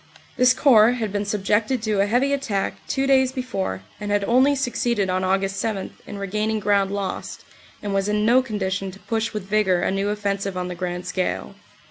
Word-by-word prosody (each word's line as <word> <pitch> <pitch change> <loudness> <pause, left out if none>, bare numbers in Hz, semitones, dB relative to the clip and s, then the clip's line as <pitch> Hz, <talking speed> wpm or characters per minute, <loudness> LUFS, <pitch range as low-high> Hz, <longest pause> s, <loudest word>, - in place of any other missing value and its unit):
This 250 0 +4
Corps 235 -4 +6
had 220 -5 -3
been 205 0 -1
subjected 210 +4 0
to 210 -3 +1
a 200 - +2
heavy 255 +6 +2
attack 230 -9 -1
two 270 - 0
days 265 -1 +4
before 220 - -3 0.2
and 210 -1 -5
had 205 0 +1
only 260 +6 +4
succeeded 235 -6 0
on 185 0 0
Aug. 195 +1 +1
7 195 +1 -3
in 205 - -7
regaining 215 +2 -1
ground 200 -1 +2
lost 200 -1 -4 0.4
and 205 -1 -2
was 195 +1 0
in 210 0 +1
no 245 +3 +5
condition 195 -5 -3
to 190 +1 -12
push 225 +1 -2
with 210 -3 -4
vigor 195 -3 +2
a - - +1
new 195 +1 -1
offensive 200 -2 -2
on 180 0 -3
the - - -4
grand 180 0 -4
scale. 185 0 -2
205 Hz, 195 wpm, -23 LUFS, 195-230 Hz, 0.4 s, Corps